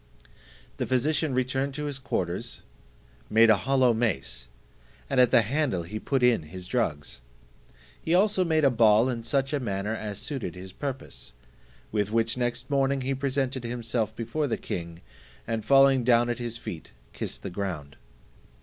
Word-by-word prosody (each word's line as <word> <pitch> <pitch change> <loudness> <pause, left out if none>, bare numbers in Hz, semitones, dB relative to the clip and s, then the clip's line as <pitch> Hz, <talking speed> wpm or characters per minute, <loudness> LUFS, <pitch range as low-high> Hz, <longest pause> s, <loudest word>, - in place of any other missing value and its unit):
The - - -2
physician 140 +2 +1
returned 130 +2 -1
to 150 - -4
his 145 -2 -4
quarters, 90 -9 -3 0.7
made 115 +1 +6
a - - +6
hollow 130 +1 +3
mace, 70 - -2 0.6
and - - +1
at 125 -2 +6
the 115 - +5
handle 125 - 0
he 105 +6 -6
put 135 +1 0
in 125 -6 +4
his 90 +4 -9
drugs; 80 - -2 0.8
he - - -7
made - - +6
also 195 -3 +2
a 155 -3 +4
ball 115 +1 +5
in 120 -2 -3
such 135 +4 0
a 145 - +1
manner 105 -3 -2
as 105 -3 -5
suited 120 - -4
his 95 +1 -9
purpose, 130 - -7 0.6
with 105 -1 0
which 115 0 +1
next 120 -1 -2
morning 140 -1 +1
he 135 +1 -1
presented 135 -1 -1
himself 115 -2 -2
before 120 +7 -2
the 120 - -1
king, 85 0 -6 0.4
and 115 -1 -3
falling 135 -2 +5
down 120 0 +4
at 120 - -4
his 120 -1 -4
feet, 85 -7 -8 0.2
kissed - - -5
the 100 - -5
ground. 85 -7 -5
120 Hz, 165 wpm, -27 LUFS, 105-135 Hz, 0.8 s, made